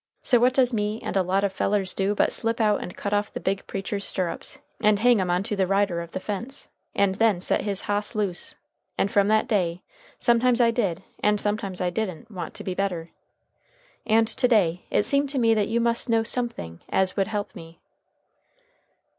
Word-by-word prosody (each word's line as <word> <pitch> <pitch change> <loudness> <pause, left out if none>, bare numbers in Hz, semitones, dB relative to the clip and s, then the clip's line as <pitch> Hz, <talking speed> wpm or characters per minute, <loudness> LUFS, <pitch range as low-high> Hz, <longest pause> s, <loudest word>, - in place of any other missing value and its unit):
So 245 - +4
what 250 +2 +3
does 255 -2 +3
me 210 0 -1
and - - -4
a 195 - +4
lot 190 +2 0
of 200 -1 0
fellers 195 -1 0
do 200 +2 0
but - - +2
slip 230 +1 -1
out 210 -2 +2
and 180 - -8
cut 200 - -3
off 205 0 0
the - - -5
big 195 +1 -2
preacher's 200 +1 -4
stirrups, 185 -4 -1 0.2
and 210 -2 +4
hang 235 -1 +4
'em 180 - -1
on 180 +2 +1
to 210 0 -2
the 190 -2 +1
rider 195 -3 +1
of 170 - -8
the 185 - -5
fence, 225 +8 -5 0.3
and 200 -1 +3
then 210 -2 +2
set 180 - +1
his 200 -2 0
hoss 205 +2 -2
loose! 200 -5 -1 0.4
And 195 - +1
from 200 -1 +3
that 215 +2 +2
day, 180 -6 0 0.3
sometimes 240 +1 +3
I 235 -1 +5
did, 195 -7 -1 0.2
and 210 0 +2
sometimes 200 -3 -2
I 180 -1 0
didn't, 200 +1 -4
want 180 -4 -6
to - - -6
be 185 - -3
better. 180 -4 -3 0.9
And 225 0 +3
to 250 +3 +1
day 180 -7 +2
it - - +2
seemed 280 +5 +2
to 275 - -3
me 230 -3 +4
that 210 -2 +1
you 230 +1 0
must 235 +1 +1
know 225 -1 +3
somethin' 225 - -3
as 190 -1 +2
would 195 -1 +1
help 205 -1 -3
me." 165 0 -12
205 Hz, 210 wpm, -25 LUFS, 190-225 Hz, 0.9 s, I